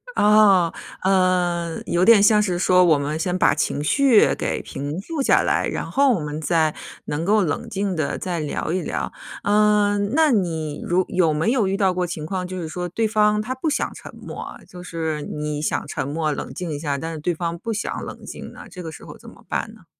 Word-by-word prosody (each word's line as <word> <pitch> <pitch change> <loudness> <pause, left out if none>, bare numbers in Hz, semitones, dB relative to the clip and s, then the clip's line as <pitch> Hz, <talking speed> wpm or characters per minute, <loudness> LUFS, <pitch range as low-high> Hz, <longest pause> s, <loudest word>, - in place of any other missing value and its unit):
哦。 205 -5 +5 0.3
嗯， 180 -3 +1
有 175 +1 +1
点 230 -3 +7
像 210 +1 +5
是 185 -4 0
说 180 0 +5
我 160 -3 +5
们 145 +2 -2
先 180 +2 -1
把 - - +4
情 145 - -1
绪 260 - +4
给 - - -2
平 145 +5 -5
复 315 +7 -4
下 - - +4
来， - - +1
然 - - -4
后 275 -1 +3
我 200 - -1
们 150 0 -4
再 160 -1 +1 0.3
能 160 +3 -3
够 210 +2 +4
冷 165 +9 -2
静 200 -2 -2
的 155 -3 -1
再 175 -2 -3
聊 150 +1 -3
一 185 +1 0
聊。 - - -3 0.3
嗯， 205 0 +3
那 310 -1 +4
你 160 -8 -1
如 180 +1 +1
有 175 -4 +2
没 160 +9 +1
有 230 -7 +2
遇 195 - 0
到 190 -3 +2
过 180 0 -1
情 160 -3 -5
况， 180 +2 -3
就 185 -1 -5
是 160 - -4
说 180 +2 -4
对 220 +6 -1
方 210 -1 +2
他 250 +4 -3
不 310 +5 -1
想 300 - -1
沉 - - -11
默 - - -9
啊， - - -8
就 180 -1 -11
是 160 -3 -3
你 150 0 -4
想 - - -1
沉 - - -3
默， 155 +1 -1
冷 135 - -5
静 170 +3 -5
一 145 - -4
下， 145 -3 -2
但 165 +4 -5
是 160 - -6
对 175 +4 -1
方 170 0 -3
不 225 +6 -4
想 215 - -3
冷 - - -9
静 - - -8
呢？ - - -11
这 180 - -9
个 160 - -6
时 - - -12
候 - - -11
怎 - - -13
么 - - -18
办 - - -2
呢？ - - -18
180 Hz, 245 characters per minute, -22 LUFS, 160-210 Hz, 0.3 s, 点